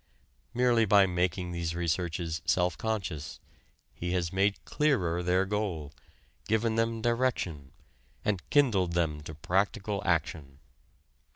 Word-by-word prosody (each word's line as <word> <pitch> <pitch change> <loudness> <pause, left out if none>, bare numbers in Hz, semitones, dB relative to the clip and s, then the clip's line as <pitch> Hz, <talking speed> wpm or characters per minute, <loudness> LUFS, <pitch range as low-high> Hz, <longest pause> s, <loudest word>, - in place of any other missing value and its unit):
Merely 120 -2 +4
by 100 -1 +6
making 90 0 -1
these 85 -1 -3
researches 85 -1 -2
self 90 -2 +1
conscious, 90 -9 -4 0.5
he 90 +1 -3
has 85 -1 -1
made 100 +1 +1
clearer 95 - +1
their 90 +2 +2
goal, 95 -8 -3 0.5
given 110 +1 +1
them 115 0 0
direction, 115 - -1 0.5
and 100 -4 0
kindled 105 -12 +3
them 80 -3 0
to 80 +1 -8
practical 100 +5 -1
action. 80 -5 -1
90 Hz, 115 wpm, -29 LUFS, 85-110 Hz, 0.5 s, by